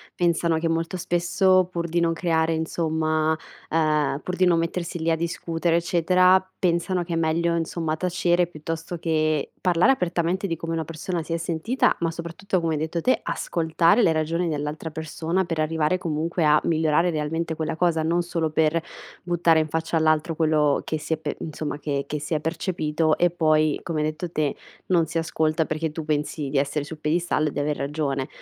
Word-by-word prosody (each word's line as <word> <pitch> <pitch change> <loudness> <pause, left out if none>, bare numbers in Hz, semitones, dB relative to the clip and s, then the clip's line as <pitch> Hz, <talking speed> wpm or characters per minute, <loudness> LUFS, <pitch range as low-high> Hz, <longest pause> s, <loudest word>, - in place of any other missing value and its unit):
pensano 170 -1 +1
che 165 - -1
molto 165 +3 -1
spesso 180 +1 +2
pur 170 -1 -2
di 170 +1 0
non 165 -1 +2
creare 165 -1 +1
insomma 160 -1 0 0.3
ehm, 155 -3 +1
pur 180 - -3
di 185 - +3
non 170 -2 +4
mettersi 170 +1 -3
lì 165 +1 +1
a - - +3
discutere 165 0 -1
eccetera 180 +2 +4 0.2
pensano 175 0 0
che 170 0 -5
è - - 0
meglio 165 +1 +1
insomma 165 -1 -2
tacere 175 0 +1
piuttosto 165 +1 -5
che 155 -2 0
parlare 180 +6 +4
apertamente 180 -3 0
di 165 - -1
come 165 +1 -4
una 165 -1 -2
persona 165 +2 -4
si 165 - -9
è 165 - +1
sentita, 170 +10 0
ma 165 -1 0
soprattutto 170 +3 -3
come 165 -1 -1
hai 150 - -1
detto 160 +2 -2
te, 255 - +2
ascoltare 165 +5 +2
le 170 - +4
ragioni 165 +2 0
dell'altra 150 +1 -3
persona 160 0 -7 0.2
per 165 -2 -3
arrivare 155 +2 +1
comunque 165 0 -1
a 150 0 +5
migliorare 160 +1 +2
realmente 160 +1 -2
quella 160 0 -2
cosa, 165 -1 +1
non 170 +2 +1
solo 170 -2 -1
per 160 +1 +2 0.4
buttare 170 -2 +3
in 155 - 0
faccia 160 +1 -1
all'altro 155 +1 +2
quello 155 -2 +2
che 155 - -2
si 155 - -8
è - - -1
pe 150 -1 -4
insomma 155 -2 -4
che 150 - -20 0.2
che 150 - -3
si 150 +2 -2
è - - +1
percepito 160 -1 0
e 175 -1 +3
poi 155 -3 +2
come 155 -2 -2
hai 155 - +1
detto 165 +2 -6
te, 150 -3 0 0.3
non 170 -3 +3
si 165 +2 -3
ascolta 160 -1 0
perché 155 0 -2
tu 160 0 -6
pensi 150 -1 -2
di 140 - -1
essere 140 +1 -1
sul 155 +1 -9
piedistallo 155 0 0
e - - -7
di - - -4
aver 145 +1 -1
ragione. 140 -2 -2
165 Hz, 195 wpm, -24 LUFS, 155-170 Hz, 0.4 s, a